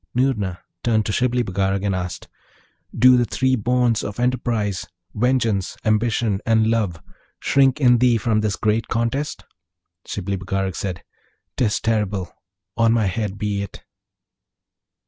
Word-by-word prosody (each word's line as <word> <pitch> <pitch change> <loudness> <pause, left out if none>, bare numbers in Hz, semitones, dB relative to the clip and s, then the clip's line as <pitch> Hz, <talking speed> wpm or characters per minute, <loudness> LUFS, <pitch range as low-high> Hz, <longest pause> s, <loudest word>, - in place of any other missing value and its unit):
Noorna 105 -8 0 0.2
turned 110 -3 +2
to - - -1
Shibli 125 +2 +1
Bagarag 95 0 -1
and 100 - +1
asked, 90 -1 -4 0.7
'Do 125 0 +7
the 120 - +2
three 130 +2 +1
bonds 120 0 +1
of 105 - -5
enterprise 115 -6 -1 0.3
vengeance, 115 -4 0
ambition, 110 -1 +1
and 110 -1 +3
love 105 -7 0 0.4
shrink 135 0 +3
in 125 -4 +5
thee 125 -1 +4
from 110 -1 +1
this 105 -2 0
great 110 0 0
contest?' 120 +5 -2 0.6
Shibli 100 0 -3
Bagarag 95 0 -2
said, 95 -3 -4 0.5
''Tis 110 -4 +1
terrible! 105 -4 -1 0.4
on 115 0 +3
my 115 -2 +2
head 100 0 -2
be 105 -1 -2
it!' 100 - -8
110 Hz, 135 wpm, -22 LUFS, 100-120 Hz, 0.7 s, Do